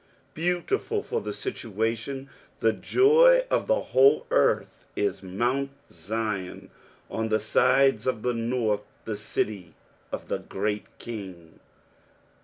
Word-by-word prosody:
2 160 - -9
Beautiful 290 - 0
for 460 +1 -3
situation, 115 - -3 0.3
the 110 0 +2
joy 475 - +5
of - - +1
the - - +3
whole 135 +3 +5
earth, - - +1
is 105 - -1
mount 120 +9 -1 0.2
Zion, 100 +1 -4 0.4
on 110 0 -2
the 110 0 +2
sides 130 +2 +3
of 120 -4 -1
the 125 - +1
north, 115 -3 0 0.2
the 110 - -3
city 100 -4 -3 0.4
of - - -5
the - - -2
great 105 +1 -3
King. 95 -8 -9
115 Hz, 120 wpm, -26 LUFS, 105-140 Hz, 0.4 s, joy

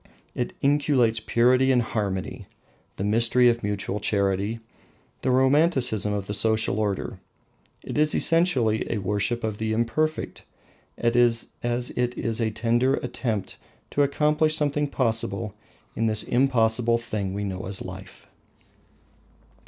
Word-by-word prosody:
It 125 - -3
inculcates 140 -5 +2
purity 125 +4 +3
and 125 -2 +3
harmony, 100 -4 -4 0.5
the - - -4
mystery 115 +4 +3
of 120 0 0
mutual 105 0 -3
charity, 100 +2 0 0.6
the - - -1
romanticism 130 - +3
of 100 -2 -2
the 100 - -4
social 110 -1 +1
order. 100 -3 -2 0.6
It - - -3
is 150 0 +3
essentially 135 -11 +2
a - - -1
worship 105 +4 -1
of 110 -2 -3
the 110 0 -1
Imperfect, 150 +8 -1 0.5
as 120 0 +2
it 120 0 -1
is 115 0 -1
a 110 - +1
tender 120 +4 +1
attempt 115 -5 -4 0.3
to 145 - +1
accomplish 150 +2 +2
something 145 -1 0
possible 115 -5 -1 0.4
in 115 - 0
this 110 -1 +1
impossible 120 -2 +2
thing 100 -4 -4
we 100 - -3
know 95 -2 -5
as 95 0 -3
life. 95 0 -10
115 Hz, 130 wpm, -25 LUFS, 105-130 Hz, 0.6 s, purity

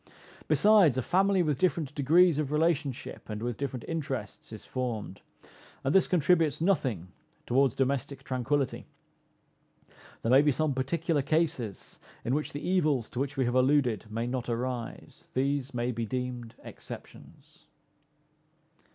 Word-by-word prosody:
Besides, 200 - +5
a 130 - 0
family 190 - +3
with 150 -4 -1
different 160 -5 0
degrees 155 +3 +4
of 145 -2 -2
relationship 150 -7 -1
and 105 +1 -4
with 120 -1 -2
different 130 -2 -4
interests 135 -12 -4
is 110 - -9
formed, 115 -7 -4 0.6
and 135 - +1
this 190 - +5
contributes 165 -4 +2
nothing 130 - 0 0.4
towards 130 0 +2
domestic 135 0 -1
tranquillity. 135 +1 -1 1.4
There 115 - +1
may 135 +2 +7
be 150 0 +3
some 155 +1 0
particular 150 +4 0
cases 140 - -2 0.3
in 120 - 0
which 150 +2 -1
the 145 - -5
evils 155 -10 +1
to 120 - -4
which 140 +1 -2
we 130 - +2
have 120 - 0
alluded 130 -5 +2
may 115 +2 -2
not 125 0 -3
arise; 120 0 -5
these 140 0 0
may 120 0 -1
be 115 -1 -3
deemed 125 -1 -4
exceptions. - - -12
135 Hz, 140 wpm, -29 LUFS, 125-155 Hz, 1.4 s, may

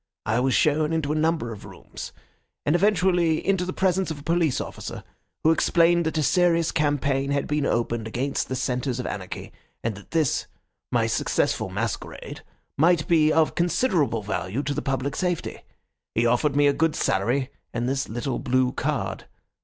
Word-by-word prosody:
I 110 +2 +1
was 130 0 +2
shown 155 +1 +2
into 155 -3 0
a - - 0
number 155 -6 0
of 105 - -11
rooms, - - -9 0.5
and 150 - +3
eventually 180 -4 +3
into 190 -2 +2
the 185 - -3
presence 190 0 +1
of 160 - -4
a - - -12
police 165 -4 +1
officer, - - -6 0.4
who 160 - +5
explained 170 0 +3
that 160 - -2
a 155 - +2
serious 170 +2 +3
campaign 145 -2 +1
had 140 0 0
been 150 -1 0
opened 115 -1 -1
against 130 +5 -2
the 130 - -1
centres 125 0 -1
of 125 - -3
anarchy, 95 -2 -6 0.3
and 115 - -1
that 100 0 -13
this, 160 -5 +1 0.4
my - - +2
successful - - 0
masquerade, 105 +3 -4 0.4
might 165 0 +4
be 155 -2 +4
of 160 0 +3
considerable 170 - +1
value 105 +5 -2
to 145 - -1
the 150 - -2
public 135 0 -2
safety. 180 -2 -2 0.6
He 115 - +2
offered 125 +5 +2
me 145 0 +4
a 140 - +4
good 160 +2 +1
salary 125 +8 0 0.2
and 120 0 -2
this 135 +1 -1
little 120 +3 -3
blue 130 0 +1
card. - - -2
145 Hz, 175 wpm, -25 LUFS, 125-165 Hz, 0.6 s, who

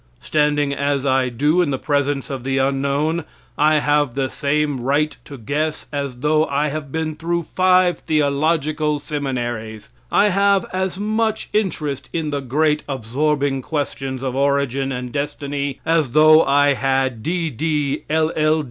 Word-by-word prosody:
Standing 145 -2 +1
as 140 -1 -1
I 130 -1 +2
do 145 +9 +2
in 170 - +1
the 135 - -1
presence 145 -1 -1
of 130 -3 -5
the 135 +1 -1
Unknown, 140 +4 0 0.3
I 155 +1 +3
have 145 -3 +1
the 135 -1 -1
same 145 -1 0
right 145 +5 0
to 140 - -9
guess 150 +6 -2
as 140 -4 -4
though 155 +1 +3
I 145 +2 0
had 145 -1 -5
been 160 0 -2
through 170 +2 -2
five 185 +1 +3
theological 150 0 0
seminary. 120 -7 -4 0.3
I 205 - +4
have 200 0 +3
as 185 0 -2
much 220 +1 -1
interest 155 -10 -2
in 160 -3 -2
the 145 -1 -2
great 150 +3 +1
absorbing 140 +2 -1
questions 135 -3 -3
of 130 -1 -2
origin 140 -1 0
and 125 -1 -4
destiny 140 0 -3
as 160 -6 +1
though 155 +1 +7
I 145 +1 +4
had 135 -3 0
D.D., 155 -2 -1
L. 160 +1 +2
L. 155 0 +2
145 Hz, 150 wpm, -20 LUFS, 135-155 Hz, 0.3 s, though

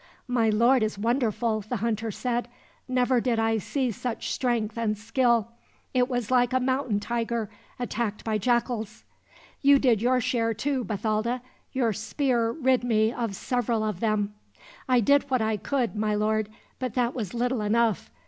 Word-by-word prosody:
"My 240 -3 +2
lord 235 +4 +4
is 215 -1 -1
wonderful," 230 -1 0
the 215 +5 -4
hunter 225 0 -1
said. 240 +3 -2 0.4
"Never 250 -1 +2
did 240 -2 0
I 225 0 +2
see 255 +4 -1
such 230 +2 -4
strength 235 -4 -1
and 220 -2 -1
skill. 230 0 +1 0.4
It 250 0 +2
was 245 -3 -2
like 245 -1 +3
a 260 - +3
mountain 255 -4 0
tiger 230 0 -2 0.3
attacked 230 -3 -3
by 215 -1 0
jackals." 235 -1 -1 0.6
"You 280 0 +6
did 245 -6 +3
your 250 +2 +3
share, 235 -3 0
too, 270 +2 -1
Bathalda. 220 +3 -1 0.3
Your 240 -4 +1
spear 235 +1 0
rid 255 -1 +1
me 220 -1 +2
of 230 -6 -3
several 235 0 -1
of 210 -4 -2
them." 210 -2 0 0.6
"I 250 -1 +5
did 280 +5 +3
what 255 -4 +2
I 220 0 +1
could, 245 +2 -1
my 210 0 0
lord; 215 0 0 0.3
but 255 -4 -3
that 245 -1 +1
was 220 -4 -4
little 245 0 0
enough. 220 0 +1
235 Hz, 165 wpm, -26 LUFS, 215-250 Hz, 0.6 s, You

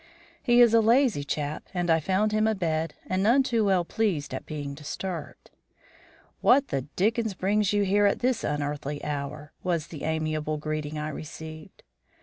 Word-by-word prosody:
He 240 -1 +5
is 235 -2 +6
a 230 - +6
lazy 230 - +3
chap 145 +1 -3
and 175 -1 0
I 165 - +4
found 190 +6 +1
him 215 +1 +2
abed, 165 -6 -1
and 185 0 -1
none 240 +7 +4
too 235 -4 +1
well 185 -3 +2
pleased 190 -8 -1
at - - -5
being 145 -2 -5
disturbed. 155 +2 -6 0.9
"What 275 +3 +4
the 135 0 -2
dickens 220 +1 +1
brings 200 +2 +1
you 205 0 +2
here 205 +1 +3
at 200 - +1
this 250 -1 0
unearthly 145 0 -3
hour?" 145 +1 -5
was 170 -3 -1
the 155 -5 -8
amiable 155 -1 -1
greeting 155 0 -4
I 150 0 -3
received. 155 +1 -9
170 Hz, 165 wpm, -27 LUFS, 150-215 Hz, 0.9 s, is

